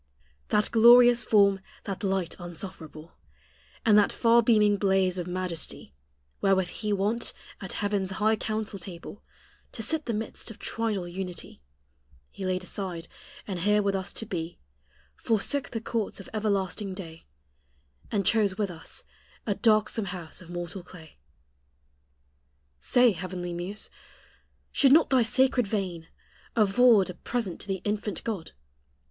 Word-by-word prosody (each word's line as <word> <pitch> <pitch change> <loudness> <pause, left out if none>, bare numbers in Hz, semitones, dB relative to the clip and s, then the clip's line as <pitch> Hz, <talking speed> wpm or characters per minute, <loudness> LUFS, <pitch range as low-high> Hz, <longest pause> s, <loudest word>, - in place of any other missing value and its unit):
That 210 - +2
glorious 240 +1 +7
form, 200 -2 +4 0.2
that 195 +1 -5
light 190 -3 -1
unsufferable, 170 -2 -8 0.7
And 215 -2 +6
that 205 - +3
far 235 0 +4
beaming 210 -3 +4
blaze 190 -2 +2
of 175 - -4
majesty 180 - -4 0.5
Wherewith 190 -2 +3
He 210 +2 -4
wont 205 +4 0 0.3
at 190 - -6
heaven's 200 -2 0
high 215 +3 +2
council 215 -2 -3
table 175 +2 -9 0.5
To 225 - -4
sit 315 +5 -1
the 230 - 0
midst 220 +2 -5
of 225 - -10
Trinal 215 -6 -2
Unity, 180 - -7 0.7
He 190 - -5
laid 185 0 -1
aside; 180 -3 -5 0.4
and 190 -4 -4
here 210 +3 +3
with 200 0 +1
us 190 -1 -2
to 225 - -5
be, 175 -5 -4 0.6
Forsook 230 +5 0
the 225 - -3
courts 225 -2 -3
of 195 - -11
everlasting 200 -2 -1
day, 165 - -9 0.8
And 200 -2 0
chose 205 -4 +3
with 205 -3 -1
us 165 -1 -5 0.4
a 210 - +1
darksome 215 0 +2
house 180 -4 -7
of 170 - -13
mortal 175 +1 -5
clay. 160 - -15 1.6
Say, 245 - +4
heavenly 180 -1 -5
muse, 180 +5 -5 0.8
shall 275 - +5
not 310 +3 +5
thy 260 -2 +5
sacred 245 0 +2
vein 185 -6 -3 0.5
Afford 215 -2 +5
a - - -9
present 220 -3 -3
to - - -7
the 190 -2 -3
infant 210 -3 -2
God? 205 -8 -4
200 Hz, 140 wpm, -27 LUFS, 180-220 Hz, 1.6 s, glorious